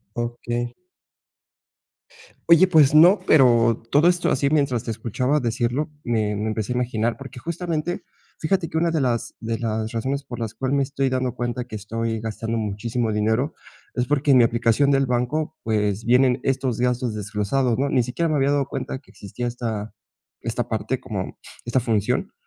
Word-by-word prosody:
Okey. 120 0 -3 1.8
Oye, 170 +3 +7
pues 155 -6 +5
no, 175 +6 +7
pero, 120 - +4
todo 150 +7 +5
esto 175 0 +1
así 140 +1 +1
mientras 140 -6 +1
te 115 - -3
escuchaba 125 +6 0
decirlo, 120 +4 -1
me 110 -3 0
me 105 +2 -2
empecé 110 +2 -2
a - - -5
imaginar 120 -2 0
porque, 135 -2 -10
justamente, 170 +1 -3 0.3
fíjate 170 +2 0
que 160 - -3
una 170 +1 +2
de 165 - 0
las 125 -4 -1
de 115 0 -3
las 110 -1 -2
razones 135 +5 -2
por 120 -2 -7
las 115 -2 -4
cuales 130 +5 -1
me 140 - +3
estoy 135 0 -1
dando 130 -1 -1
cuenta 120 0 -2
que 115 -3 -7
estoy 115 +2 -3
gastando 115 +1 -3
muchísimo 110 +2 -2
dinero 110 +8 0 0.4
es 125 0 0
porque, 145 0 +2
en 130 - +7
mi - - +7
aplicación 115 +4 +2
del 135 0 +3
banco, 130 +6 -1
pues 105 -1 0
vienen 125 +1 +3
estos 130 -3 0
gastos 125 -1 0
desglosados, 105 +4 0
¿no? 140 - +1
Ni 130 -3 +2
siquiera 130 +8 -1
me 155 - 0
había 140 0 +2
dado 145 -1 +1
cuenta - - -5
de - - -7
que 135 - -22
existía 120 +5 -6
esta 115 -3 -4 0.5
esta - - -2
parte - - -2
como - - -5 0.2
esta 120 +2 +1
función. 110 -4 0
125 Hz, 180 wpm, -23 LUFS, 115-140 Hz, 1.8 s, Oye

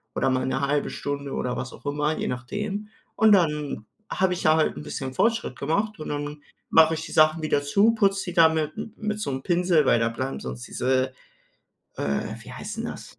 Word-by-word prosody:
oder - - +2
mal 130 0 0
'ne 130 +1 -1
1/2 140 +1 0
Stunde 140 -1 -4
oder 125 0 -2
was 130 - -5
auch - - -15
immer, 150 +2 0
je - - -2
nachdem. 205 - -4 0.3
Und 220 -1 +5
dann 150 - +1 0.3
habe 190 -1 +2
ich 180 - -4
ja 155 - +5
halt 155 - +1
'n 75 - -6
bisschen 130 - -5
Fortschritt 230 - 0
gemacht 200 +8 -1
und 155 - -6
dann 145 0 -4 0.3
mache 160 0 +6
ich 160 - -4
die - - -9
Sachen 155 +1 +4
wieder 150 -2 +1
zu, 200 +10 +4
putze 195 -3 +2
die - - -9
da 165 -2 +7
mit 155 -1 -1
m-m 215 0 -6
mit 210 -1 -3
so 140 - -2
'm 130 0 -4
Pinsel, 175 -3 +3
weil 120 - +4
da 115 0 +2
bleiben 130 +3 -4
sonst 60 -1 -7
diese 130 0 0 0.9
äh, 70 0 -2
wie - - -11
heißt - - -7
'n - - -3
das? - - -9
150 Hz, 220 wpm, -25 LUFS, 130-185 Hz, 0.9 s, da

